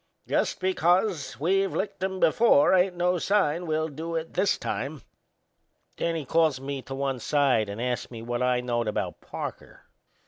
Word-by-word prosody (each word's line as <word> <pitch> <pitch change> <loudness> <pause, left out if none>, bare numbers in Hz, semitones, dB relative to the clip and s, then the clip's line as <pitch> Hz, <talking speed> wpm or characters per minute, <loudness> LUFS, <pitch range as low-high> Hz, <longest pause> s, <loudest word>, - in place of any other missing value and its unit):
Just - - 0
because 180 -3 +1
we've 195 +5 +1
licked 195 -1 -3
'em 190 0 -2
before 185 -4 +5
ain't 185 0 +3
no 180 0 +1
sign 175 -3 +1
we'll 155 0 0
do 160 +3 -5
it 165 0 -4
this 195 +2 +2
time." - - -4 0.9
Then 170 0 -1
he 155 -3 -4
calls 160 -1 +2
me 135 0 -4
to 135 - -7
one 135 -1 -2
side 130 -7 +2
and 100 +2 -6
ast 125 0 -2
me 115 -2 -8
what 120 +1 -3
I 125 -1 +2
knowed 120 -2 -1
about 105 - -3
Parker. - - -7
155 Hz, 170 wpm, -26 LUFS, 130-180 Hz, 0.9 s, before